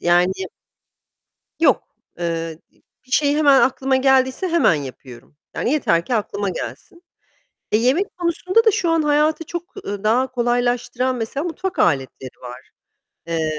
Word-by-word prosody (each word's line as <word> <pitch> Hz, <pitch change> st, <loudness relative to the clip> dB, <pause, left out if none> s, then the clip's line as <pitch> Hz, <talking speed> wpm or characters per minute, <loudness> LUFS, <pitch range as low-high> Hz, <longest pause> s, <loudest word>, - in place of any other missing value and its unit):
yani 175 Hz, +2 st, +3 dB, 1.3 s
Yok, 280 Hz, -8 st, +3 dB, 0.4 s
eee, 165 Hz, -1 st, -3 dB
bi -, -, -32 dB, 0.2 s
bir 255 Hz, -, -22 dB
şey 290 Hz, +1 st, +3 dB
hemen 285 Hz, -4 st, +5 dB
aklıma 265 Hz, +2 st, +1 dB
geldiyse 260 Hz, +5 st, +2 dB
hemen 335 Hz, -, +3 dB
yapıyorum. 130 Hz, -2 st, -8 dB, 0.2 s
Yani, 245 Hz, -, -1 dB
yeter 170 Hz, -, +1 dB
ki 245 Hz, -, -1 dB
aklıma 205 Hz, -2 st, -2 dB
gelsin. 345 Hz, -, -7 dB, 0.7 s
Eee, 215 Hz, -, +3 dB
yemek 285 Hz, -, 0 dB
konusunda 365 Hz, +6 st, +1 dB
da 440 Hz, -, +6 dB
şu 350 Hz, -3 st, 0 dB
an 330 Hz, -1 st, +2 dB
hayatı 300 Hz, +2 st, +2 dB
çok, 345 Hz, +1 st, -5 dB, 0.2 s
eee, 200 Hz, 0 st, -5 dB
daha 245 Hz, +5 st, +2 dB
kolaylaştıran, 245 Hz, +1 st, 0 dB
mesela, 245 Hz, +6 st, -3 dB
mutfak 355 Hz, +2 st, -4 dB
aletleri 135 Hz, -4 st, -1 dB
var. 125 Hz, 0 st, -10 dB, 0.6 s
Eee 160 Hz, -2 st, -2 dB
255 Hz, 140 wpm, -20 LUFS, -, 1.3 s, da